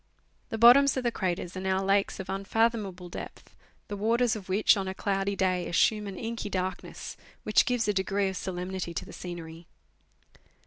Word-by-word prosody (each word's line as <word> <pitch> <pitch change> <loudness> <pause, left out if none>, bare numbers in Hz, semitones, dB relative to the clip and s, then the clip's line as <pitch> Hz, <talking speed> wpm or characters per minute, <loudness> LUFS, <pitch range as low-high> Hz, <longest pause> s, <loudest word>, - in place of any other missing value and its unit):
The 225 - -3
bottoms 255 +5 +7
of 260 - -1
the 240 - +1
craters 180 -4 -3
are - - -3
now 190 0 0
lakes 195 0 +1
of 190 - -5
unfathomable 195 -1 -1
depth, 175 - -9 0.3
the 205 - -4
waters 230 +3 +2
of 195 -3 -8
which, 200 +3 +4
on 195 -2 -3
a 190 - -4
cloudy 195 0 -1
day, 185 -2 0
assume 210 +4 +2
an 195 -2 -6
inky 230 -2 -4
dark 185 -1 -2
ness, - - -8 0.3
which 215 - +3
gives 245 -3 +1
a 210 - +2
degree 195 +1 0
of 190 - -3
solemnity 180 -1 -4
to - - -3
the - - -12
scenery. 170 -2 -8
195 Hz, 185 wpm, -28 LUFS, 185-220 Hz, 0.3 s, bottoms